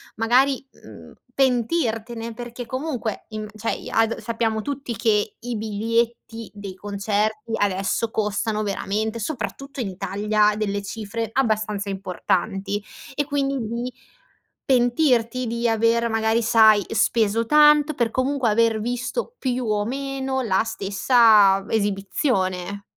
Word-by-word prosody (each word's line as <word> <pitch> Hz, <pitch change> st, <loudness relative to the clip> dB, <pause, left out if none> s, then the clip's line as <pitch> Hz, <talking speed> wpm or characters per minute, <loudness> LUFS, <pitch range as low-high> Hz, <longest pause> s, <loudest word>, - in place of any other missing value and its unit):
magari, 255 Hz, +4 st, +2 dB
mhmm, -, -, -14 dB, 0.2 s
pentirtene? 235 Hz, -3 st, 0 dB
Perché, 240 Hz, +1 st, -7 dB
comunque, 255 Hz, -3 st, -4 dB
in 215 Hz, -1 st, -5 dB
cioè 225 Hz, +2 st, -1 dB
i -, -, -7 dB
ad 225 Hz, 0 st, +1 dB
sappiamo 225 Hz, -2 st, -1 dB
tutti 270 Hz, -2 st, -4 dB
che 210 Hz, -1 st, +1 dB
i 240 Hz, -1 st, -5 dB
biglietti 225 Hz, +2 st, -2 dB
dei 200 Hz, -2 st, -8 dB
concerti 210 Hz, +2 st, -2 dB
adesso 195 Hz, +3 st, 0 dB
costano 215 Hz, 0 st, -1 dB
veramente, 215 Hz, +2 st, -2 dB
soprattutto 275 Hz, +1 st, -5 dB
in 205 Hz, -, -2 dB
Italia, 210 Hz, +3 st, +1 dB
delle 205 Hz, -1 st, -2 dB
cifre 225 Hz, +2 st, -5 dB
abbastanza 215 Hz, -5 st, 0 dB
importanti. 195 Hz, +1 st, -2 dB, 0.3 s
E, 290 Hz, -, 0 dB
quindi, 275 Hz, -1 st, -1 dB
di 235 Hz, +2 st, -4 dB, 0.7 s
pentirti 250 Hz, -1 st, +2 dB
di 235 Hz, +1 st, -1 dB
aver, 230 Hz, +1 st, +2 dB
magari 225 Hz, +1 st, +1 dB
sai, 220 Hz, -3 st, +5 dB
speso 225 Hz, 0 st, +2 dB
tanto 300 Hz, +1 st, +5 dB
per 235 Hz, -2 st, 0 dB
comunque, 260 Hz, -1 st, 0 dB
aver 225 Hz, 0 st, +2 dB
visto 245 Hz, -, -3 dB
più 255 Hz, -1 st, -2 dB
o 210 Hz, -1 st, 0 dB
meno 270 Hz, +2 st, -3 dB
la 215 Hz, -7 st, +1 dB
stessa 205 Hz, -2 st, +4 dB
esibizione? 200 Hz, -2 st, -1 dB
225 Hz, 120 wpm, -23 LUFS, 210-245 Hz, 0.7 s, sai